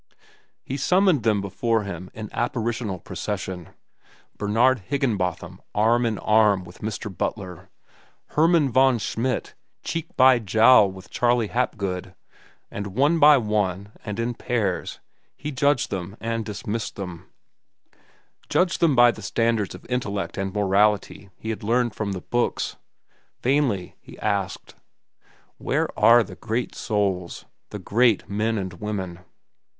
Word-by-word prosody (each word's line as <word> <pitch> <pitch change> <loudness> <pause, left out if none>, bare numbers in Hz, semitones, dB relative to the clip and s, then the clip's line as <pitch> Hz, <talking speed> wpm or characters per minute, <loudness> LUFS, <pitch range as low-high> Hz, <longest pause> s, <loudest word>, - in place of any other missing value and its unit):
He 135 - -4
summoned 180 -2 +3
them 105 -2 +2
before 110 +3 0
him 90 -2 -7
in 110 -1 -6
apparitional 115 -4 -2
procession: 90 0 -5 0.7
Bernard 115 +5 +2
Higginbotham 90 - -2
arm 115 +3 +3
in 110 -2 -2
arm 105 -3 +3
with 90 0 -14
Mr. 105 -2 -5
Butler, 90 0 -4 0.6
Hermann 160 -3 +3
von 130 0 +4
Schmidt 120 +3 -2 0.3
cheek 165 -1 -3
by 130 -1 +6
jowl 110 0 +5
with 95 +1 -13
Charley 120 -3 +1
Hapgood, 100 -6 -2 0.6
and 100 -1 -6
one 150 +5 +3
by 150 -1 +8
one 105 -4 -1
and 105 +1 -5
in 120 +1 -1
pairs 110 -5 -2 0.4
he 150 - -5
judged 140 -1 +1
them 95 +1 -5
and 115 0 -2
dismissed 110 +1 -4
them—judged 95 - -6
them 160 -5 +3
by 120 0 +7
the 110 - -11
standards 115 0 0
of - - -13
intellect 105 -6 -2
and 95 -1 -3
morality 100 0 +1
he 110 - -4
had 110 - -5
learned 120 +2 +1
from 100 -2 -3
the 90 - -5
books. 120 +5 -1 0.7
Vainly 125 -8 +1
he - - -14
asked: 100 -3 -2 0.9
Where - - 0
are 120 0 +6
the - - -11
great 115 +2 -3
souls, 100 -5 -2 0.2
the - - -6
great 110 +3 +2
men 110 +2 -1
and 95 -2 -4
women? 95 -2 -5
110 Hz, 130 wpm, -24 LUFS, 100-120 Hz, 0.9 s, by